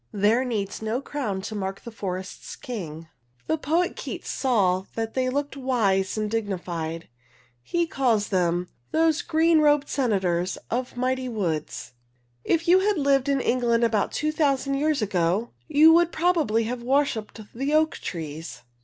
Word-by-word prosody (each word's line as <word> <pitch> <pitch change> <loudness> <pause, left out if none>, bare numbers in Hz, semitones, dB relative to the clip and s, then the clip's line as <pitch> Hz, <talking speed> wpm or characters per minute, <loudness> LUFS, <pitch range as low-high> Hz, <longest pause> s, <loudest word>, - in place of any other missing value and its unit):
There 210 +5 +2
needs 215 -6 -3
no 220 +3 -1
crown 255 -9 -3
to 215 - -5
mark 195 -2 -4
the 235 - -8
forest's 190 -3 -6
king. 165 - -7 0.4
The 315 - +1
poet 330 +5 0
Keats - - -6
saw 195 -8 +1
that 225 -1 -3
they 255 -1 0
looked 285 +2 -2
wise 220 -8 +1
and 215 0 0
dignified. 175 -7 -3 0.5
He 345 - 0
calls 245 -9 +1
them 180 -2 +1 0.2
Those 320 0 +2
green 325 0 +3
rob'd 295 -1 +3
senators 190 -9 0
of 245 +1 -2
mighty 255 0 -1
woods. 170 - -3 0.5
If 335 +1 0
you 360 +2 +6
had 405 0 +1
lived 275 -2 +2
in 275 -1 +2
England 240 -2 +1
about 220 -3 +1
two 305 0 -1
thousand 275 -3 +1
years 290 -2 +1
ago, 190 +3 0 0.2
you 310 +1 +7
would 345 0 +4
probably 315 -10 +2
have 240 +2 -4
worshiped 250 -4 0
the 275 +5 0
oak 315 0 +2
trees. 160 -5 -6
240 Hz, 155 wpm, -25 LUFS, 195-290 Hz, 0.5 s, you